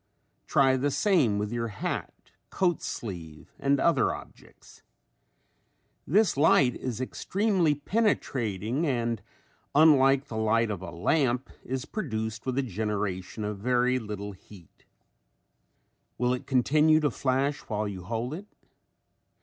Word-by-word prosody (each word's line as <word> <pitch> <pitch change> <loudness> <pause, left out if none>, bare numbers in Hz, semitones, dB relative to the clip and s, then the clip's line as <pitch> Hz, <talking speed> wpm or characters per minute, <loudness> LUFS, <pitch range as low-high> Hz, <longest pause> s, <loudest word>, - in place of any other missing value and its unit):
Try 135 -1 +4
the 140 +3 +1
same 145 - +2
with 105 +1 -2
your 115 -1 -2
hat, 100 -3 -5 0.2
coat 175 -3 0
sleeve 85 -8 -7
and 140 0 +2
other 170 - +3
objects. - - -15 1.3
This 200 +3 +3
light 140 -4 +4
is 125 -3 -4
extremely 185 - 0
penetrating 135 - -1
and 120 -4 -1 0.5
unlike 140 -3 +5
the 115 -6 -6
light 110 0 +2
of 100 -4 -4
a 95 - -6
lamp 125 - 0
is 130 0 -4
produced 110 - -4
with 130 - -1
the 140 - +1
generation 105 -2 -3
of 105 -1 -4
very 125 +3 +2
little 105 -2 -6
heat. 95 -2 -17 1.3
Will 125 0 +1
it 125 - -5
continue 150 +4 +4
to 145 -2 +1
flash 135 +3 0
while 105 -1 -3
you 95 -2 -6
hold 115 +5 -3
it? 195 +6 -7
125 Hz, 125 wpm, -28 LUFS, 105-145 Hz, 1.3 s, unlike